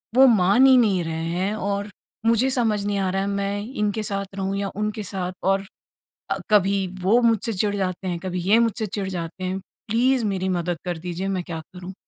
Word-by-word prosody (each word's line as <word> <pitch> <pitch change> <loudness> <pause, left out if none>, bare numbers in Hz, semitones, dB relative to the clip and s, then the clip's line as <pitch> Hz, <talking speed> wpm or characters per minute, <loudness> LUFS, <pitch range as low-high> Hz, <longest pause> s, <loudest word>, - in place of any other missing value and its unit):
वो 265 +1 +8
मान 200 +9 +5
ही 265 -1 +7
नहीं 200 -7 +3
रहे 160 0 -3
हैं 185 +5 -1
और 200 +1 -2 0.4
मुझे 230 +3 +4
समझ 225 -5 +1
नहीं 205 -1 0
आ 190 -1 0
रहा 195 +1 0
है 200 - -1
मैं 200 0 -1
इनके 210 -2 -2
साथ 200 -1 -3
रहूँ 195 0 -2
या 200 0 -2
उनके 210 +1 -2
साथ 185 -1 -3
और 195 +1 +1 0.6
अ, - - 0
कभी 195 -2 +3
वो 205 +6 +4
मुझसे 230 -1 +2
चिढ़ 205 +2 0
जाते 190 -1 -2
हैं, 175 -2 -2
कभी 180 0 -3
ये 225 +2 +6
मुझसे 230 -1 +1
चिढ़ 200 -1 -4
जाते 180 +1 -5
हैं। 185 +1 -2 0.3
प्लीज 245 +3 +2
मेरी 190 -1 -2
मदद 175 -1 -1
कर 175 -2 -2
दीजिए, 180 +3 -4
मैं 185 -2 -1
क्या 165 -2 -5
करूँ? 180 +1 -8
195 Hz, 210 wpm, -23 LUFS, 185-210 Hz, 0.6 s, वो